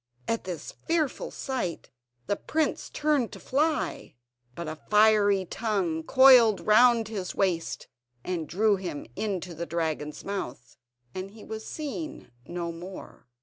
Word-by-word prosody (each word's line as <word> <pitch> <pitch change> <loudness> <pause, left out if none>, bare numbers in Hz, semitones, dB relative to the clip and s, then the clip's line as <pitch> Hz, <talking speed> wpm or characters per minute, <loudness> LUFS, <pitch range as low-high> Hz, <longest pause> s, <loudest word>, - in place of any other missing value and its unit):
At 230 - -1
this 175 -5 -5
fearful 320 -4 -1
sight 245 - -4 0.3
the 205 - 0
prince 315 +8 -1
turned 295 -6 +1
to - - -8
fly, 295 - -1 0.4
but 170 - -5
a 155 - -4
fiery 210 +1 +4
tongue 185 -6 -1
coiled 245 +1 +7
round 230 +1 +5
his 195 -5 -4
waist, 180 -4 -1 0.4
and 170 -4 -3
drew 205 +2 +3
him 180 -6 -5
into 190 -4 -3
the 170 +1 -5
dragon's 160 -3 -3
mouth, 125 -11 -5 0.4
and 185 +1 -5
he 215 +1 -13
was 220 0 -7
seen 310 +1 -6 0.2
no 170 -1 -3
more. 175 -5 -10
200 Hz, 135 wpm, -27 LUFS, 170-230 Hz, 0.4 s, coiled